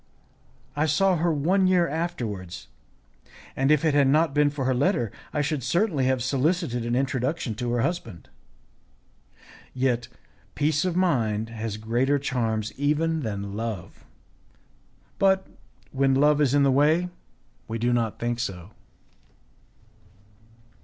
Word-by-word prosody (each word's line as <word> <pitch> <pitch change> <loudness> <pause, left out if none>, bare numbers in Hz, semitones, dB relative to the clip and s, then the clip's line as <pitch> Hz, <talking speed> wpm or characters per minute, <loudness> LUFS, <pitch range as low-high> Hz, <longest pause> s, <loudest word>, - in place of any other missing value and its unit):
I 150 +2 +1
saw 185 +5 +3
her 170 +1 +1
one 180 +6 +2
year 180 -2 +3
afterwards, 120 - -4 0.9
and 135 +1 +1
if 150 +1 +3
it 155 - +3
had 140 -2 +4
not 155 +2 +3
been 145 0 +3
for 140 -2 -4
her 130 - +2
letter, 120 -4 +1 0.2
I 150 - 0
should 150 -1 -1
certainly 170 - +1
have 130 -2 +1
solicited 135 -1 0
an 120 - 0
introduction 130 0 -1
to 120 - -1
her 120 - +1
husband. 115 - -3 1.5
Yet, 125 -2 0 0.5
peace 150 +2 +1
of 180 -2 -1
mind 115 - +1
has 110 -2 -5
greater 120 +6 +1
charms 115 -6 -2
even 155 +3 +1
than 100 -6 -4
love; 110 -3 -5 1.2
but, 190 -1 +3 0.5
when 135 0 +2
love 150 +2 +4
is 140 -1 +3
in 145 - +4
the 135 - +4
way, 155 +6 +3 0.6
we 115 - -3
do 120 +2 +1
not 115 -3 0
think 120 0 -2
so. 95 -3 -5
135 Hz, 135 wpm, -25 LUFS, 115-155 Hz, 1.5 s, had